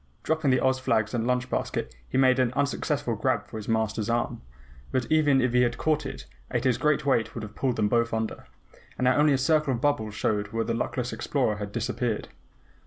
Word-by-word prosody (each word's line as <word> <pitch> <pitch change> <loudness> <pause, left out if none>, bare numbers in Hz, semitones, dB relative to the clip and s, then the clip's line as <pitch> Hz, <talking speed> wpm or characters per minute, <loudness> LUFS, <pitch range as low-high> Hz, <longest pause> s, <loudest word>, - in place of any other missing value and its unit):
Dropping 160 -3 +1
the 130 -1 +4
Oz 130 0 +2
flags 110 -4 0
and 120 -1 -1
lunch 125 0 +1
basket, 65 - -3 0.2
he - - -1
made 130 -1 +4
an 125 -2 +2
unsuccessful 140 +1 -1
grab - - 0
for - - -8
his 105 - -7
Master's 110 -1 0
arm. 120 0 -1 0.5
But 130 -2 0
even 150 -3 +4
if 125 -1 +1
he 125 - +4
had 120 0 +1
caught 155 +1 0
it, - - -8 0.2
Ato's 130 -3 +1
great 150 -1 +2
weight 115 -5 +1
would 115 - -5
have 105 0 -8
pulled 130 0 -1
them 105 -2 +1
both 115 +1 +1
under, 110 0 -3 0.5
and 125 - 0
now 125 - +4
only 150 0 +4
a - - +3
circle 145 0 +2
of 115 - -6
bubbles 125 -8 0
showed 105 0 0
where 115 +2 -2
the 115 - -1
luckless 125 +1 -2
explorer 125 -7 0
had 105 -1 -5
disappeared. 115 0 -2
125 Hz, 215 wpm, -27 LUFS, 110-135 Hz, 0.5 s, the